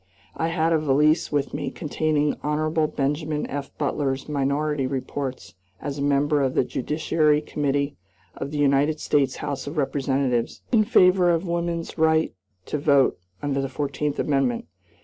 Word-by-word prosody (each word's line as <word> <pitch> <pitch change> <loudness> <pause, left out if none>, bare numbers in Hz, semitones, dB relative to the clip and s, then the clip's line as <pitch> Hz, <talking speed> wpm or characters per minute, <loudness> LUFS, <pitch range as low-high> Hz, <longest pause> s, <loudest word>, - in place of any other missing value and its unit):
I 165 - -1
had 165 0 +1
a 160 - +3
valise 150 +2 +2
with 145 -2 -1
me 145 -2 -2
containing 150 0 0
Hon. 155 +1 0
Benjamin 150 +2 -1
F. 140 0 -5
Butler's 140 -2 -1
minority 145 0 0
reports 130 0 -4 0.3
as 145 0 -5
a - - -2
member 145 +1 +2
of 130 -1 0
the - - +4
Judiciary 150 +3 +1
Committee 145 -1 -1 0.4
of - - -5
the 150 - -4
United 145 +2 +2
States 135 -3 +1
House 140 -2 -4
of 150 +3 -6
Representatives, 135 -3 0
in 220 -4 +4
favor 185 -4 +5
of 170 +2 +1
woman's 170 -1 -3
right 160 0 +3 0.3
to 150 - -2
vote 140 - +3 0.2
under 140 -1 0
the 135 - -3
Fourteenth 145 +1 -2
Amendment. 135 -5 0
145 Hz, 150 wpm, -24 LUFS, 140-155 Hz, 0.4 s, favor